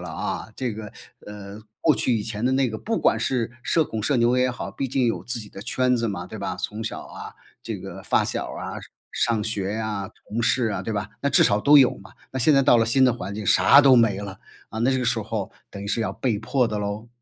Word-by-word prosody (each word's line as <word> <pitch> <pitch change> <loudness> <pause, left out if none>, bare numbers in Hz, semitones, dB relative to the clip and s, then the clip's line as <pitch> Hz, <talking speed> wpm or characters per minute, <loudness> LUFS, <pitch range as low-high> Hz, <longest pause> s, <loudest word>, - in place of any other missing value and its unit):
了 90 - -7
啊， 80 - -4
这 125 -3 -2
个， 105 -1 -8 0.3
呃， 105 0 -9 0.2
过 155 - +4
去 125 - +1
以 105 - -2
前 110 +1 -4
的 125 - +3
那 130 -1 +2
个 110 - -5
不 225 - -2
管 - - +2
是 120 -3 -1
社 160 -2 +2
恐 110 -5 -5
社 140 +5 +1
牛 120 +1 +3
也 125 0 +2
好， 120 -5 -6
毕 135 +6 -4
竟 125 -1 +1
有 115 - -1
自 120 - -3
己 105 -2 -9
的 95 - -10
圈 125 +2 +1
子 115 -1 -1
嘛， 90 -4 -5
对 110 - -9
吧？ 95 -2 -4
从 105 +1 -4
小 110 - -5
啊 - - -10 0.3
这 - - -5
个 - - -9
发 - - +2
小 - - -3
啊， - - -6 0.3
上 110 -3 0
学 100 -3 -2
呀， 105 -3 -3 0.2
同 115 +3 -2
事 120 +1 +2
啊， 100 - -3
对 110 - -4
吧？ 100 -1 -3
那 140 - 0
至 - - +5
少 100 +1 +2
都 145 +5 +7
有 130 - +4
嘛， 95 -1 -14 0.2
那 130 - -3
现 155 - +4
在 135 - +5
到 130 -2 +5
了 115 - +3
新 130 +3 +3
的 125 - +4
环 110 -4 -6
境 105 0 -5
啥 95 +11 +7
都 135 -2 +6
没 115 -5 +4
了， 95 -2 -7 0.3
啊， 110 - -5
那 125 +3 +3
这 130 - +1
个 125 - -1
时 115 -1 +1
候 105 -2 -4 0.2
等 100 - -8
于 100 - -6
是 105 - -1
要 100 -4 -1
被 115 +1 -1
迫 125 +3 +1
的 105 -2 -3
咯。 105 +3 -4
115 Hz, 280 characters per minute, -24 LUFS, 105-125 Hz, 0.3 s, 都